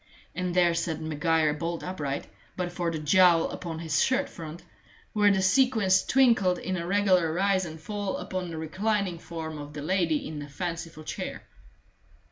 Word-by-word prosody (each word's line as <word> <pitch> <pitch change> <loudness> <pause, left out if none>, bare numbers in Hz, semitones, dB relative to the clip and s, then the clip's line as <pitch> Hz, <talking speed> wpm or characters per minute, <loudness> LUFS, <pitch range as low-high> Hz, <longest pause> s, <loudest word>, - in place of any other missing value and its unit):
And 180 +1 -2
there 175 -2 +4
sat 165 -1 -2
Maguire 160 0 +1
bolt 165 +2 -4
upright, 145 -7 -3 0.3
but 180 -1 -2
for 175 -1 -2
the 165 - -3
jowl 170 +2 +4
upon 165 -2 -5
his 160 -2 0
shirt 265 +2 +1
front, 165 -1 -9 0.5
while 205 -1 +4
the 190 -1 +2
sequins 210 -3 +4
twinkled 230 -9 +3
in 185 - -3
a 170 -1 -3
regular 185 -4 +3
rise 190 +2 +1
and 160 -1 -8
fall 205 +3 -3
upon 185 -2 -4
the 165 - -6
reclining 190 +2 -1
form 160 -2 -6
of 145 0 -8
the 150 - -6
lady 170 -3 +1
in 155 -1 -6
the 145 0 -7
fanciful 165 0 -5
chair. - - -5
175 Hz, 170 wpm, -27 LUFS, 160-190 Hz, 0.5 s, there